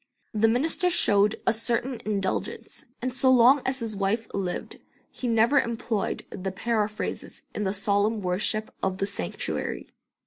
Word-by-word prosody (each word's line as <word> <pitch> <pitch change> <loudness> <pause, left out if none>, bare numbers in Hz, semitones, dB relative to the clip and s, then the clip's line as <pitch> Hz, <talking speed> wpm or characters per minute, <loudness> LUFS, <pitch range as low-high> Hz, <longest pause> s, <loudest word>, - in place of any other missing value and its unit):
The 220 +1 +3
minister 310 +10 +2
showed 210 - +3
a 235 - +4
certain 235 +2 -1
indulgence, 200 -3 -3 0.2
and 255 0 -1
so 260 +1 +2
long 260 +2 +6
as 260 0 +1
his 225 -2 -3
wife 200 +3 0
lived 185 -3 -3 0.3
he 250 - -5
never 230 +4 +4
employed 230 -3 -2
the 190 0 -4
paraphrases 215 +1 -2
in 210 - -2
the 190 - +1
solemn 205 +2 +1
worship 205 +4 -1
of 190 -1 0
the 195 - 0
sanctuary. 90 - -4
220 Hz, 145 wpm, -26 LUFS, 200-235 Hz, 0.3 s, long